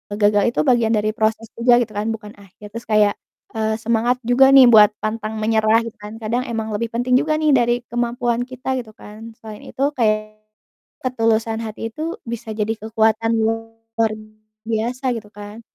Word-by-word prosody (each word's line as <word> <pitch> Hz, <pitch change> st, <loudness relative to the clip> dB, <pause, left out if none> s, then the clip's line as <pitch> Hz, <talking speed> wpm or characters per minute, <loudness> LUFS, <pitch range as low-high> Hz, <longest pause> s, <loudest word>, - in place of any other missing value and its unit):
gagal 205 Hz, -1 st, +3 dB
itu -, -, +1 dB
bagian 240 Hz, -4 st, +3 dB
dari 215 Hz, 0 st, 0 dB
proses 220 Hz, +1 st, 0 dB
juga 240 Hz, +1 st, +4 dB
gitu 220 Hz, -2 st, -4 dB
kan, 210 Hz, +2 st, -2 dB
bukan 215 Hz, -1 st, -9 dB
akhir. 205 Hz, +1 st, -15 dB
Terus 230 Hz, -, -7 dB
kayak, 210 Hz, -1 st, +4 dB, 0.4 s
eee, 220 Hz, 0 st, -1 dB
semangat 235 Hz, +2 st, +1 dB
juga 255 Hz, +3 st, +5 dB
nih 270 Hz, -1 st, +9 dB
buat 210 Hz, -3 st, +8 dB
pantang 215 Hz, 0 st, -4 dB
menyerah 220 Hz, +1 st, +2 dB
gitu 230 Hz, -, -7 dB
kan, 210 Hz, +2 st, -9 dB
kadang 235 Hz, +3 st, -1 dB
emang 220 Hz, -2 st, -3 dB
lebih 225 Hz, +2 st, -2 dB
penting 245 Hz, +2 st, -1 dB
juga 310 Hz, +2 st, 0 dB
nih 310 Hz, -1 st, +2 dB
dari 240 Hz, -1 st, +2 dB
kemampuan 240 Hz, 0 st, -1 dB
kita 255 Hz, +1 st, -5 dB
gitu 225 Hz, -, -15 dB
kan. 220 Hz, +2 st, -11 dB
Selain 215 Hz, -2 st, -11 dB
itu 270 Hz, -, -3 dB
kayak 215 Hz, -3 st, -1 dB, 0.7 s
ketulusan 225 Hz, -2 st, 0 dB
hati 220 Hz, +1 st, -6 dB
itu 320 Hz, +2 st, -5 dB
bisa 230 Hz, -1 st, -6 dB
jadi 215 Hz, +1 st, -1 dB
kekuatan 220 Hz, +1 st, +1 dB
luar 225 Hz, 0 st, -2 dB, 0.5 s
biasa 240 Hz, +4 st, -2 dB
gitu 210 Hz, -2 st, -11 dB
kan. 205 Hz, +2 st, -10 dB
225 Hz, 170 wpm, -20 LUFS, 215-240 Hz, 0.7 s, nih